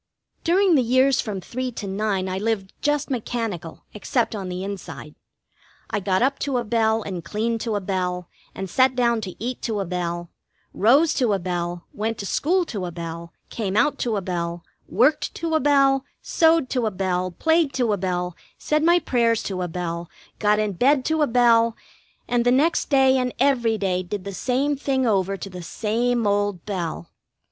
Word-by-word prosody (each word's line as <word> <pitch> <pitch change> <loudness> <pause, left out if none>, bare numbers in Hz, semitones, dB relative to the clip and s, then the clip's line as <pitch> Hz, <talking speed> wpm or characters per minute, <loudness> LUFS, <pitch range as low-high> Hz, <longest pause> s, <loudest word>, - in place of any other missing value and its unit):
During 370 +2 +3
the 280 - +5
years 260 +2 +3
from 200 -4 -5
three 255 +6 -4
to 210 - -6
nine 195 -1 -1
I 185 0 -2
lived 205 -3 -2
just 295 -1 0
mechanical, 225 -9 -4
except 225 +3 -1
on 195 -4 -4
the 180 +1 -4
inside. 195 -6 -7 0.8
I 210 - 0
got 190 +1 +1
up 275 +1 +1
to 275 -3 -1
a 240 - 0
bell 220 0 +1
and 185 -4 -5
cleaned 225 +4 -2
to 225 -3 -2
a 205 - -1
bell, 180 -2 -2 0.3
and 190 - -4
sat 255 +6 +3
down 235 -2 +2
to 190 -4 -6
eat 245 +3 -4
to 220 -3 -2
a 195 - -1
bell; 175 -1 -3 0.4
rose 275 - +4
to 240 -5 +2
a - - +2
bell, 175 -1 -3
went 220 +2 -2
to 200 - -5
school 350 - +1
to 200 - -4
a - - -6
bell, 170 0 -7 0.2
came 205 -3 -2
out 295 - +2
to 235 -3 0
a - - -1
bell, 170 -2 -3 0.3
worked 265 +8 +2
to 330 -1 -3
a 315 - +4
bell, 275 -1 +3 0.2
sewed 325 -4 +3
to 245 -4 +1
a - - +2
bell, 185 -1 -1
played 320 - +2
to 240 -5 +1
a - - 0
bell, 180 -2 -2 0.2
said 305 0 0
my 345 +2 +5
prayers 235 -8 +1
to 185 -2 -3
a 180 - -1
bell, 170 0 -4 0.3
got 210 0 +3
in 210 -1 0
bed 260 +7 +3
to 315 0 +1
a 295 - +4
bell, 230 -1 +4 0.5
and 240 -1 +1
the 245 - +3
next 295 +7 +2
day 265 -2 +4
and 250 -1 -2
every 240 -5 +2
day 185 -3 0
did 185 +2 -5
the 200 +1 -6
same 265 +8 0
thing 265 -2 0
over 195 -3 +1
to 195 - -7
the 180 -1 -7
same 230 +6 -1
old 205 -3 0
bell. 170 - -4
220 Hz, 195 wpm, -23 LUFS, 185-255 Hz, 0.8 s, the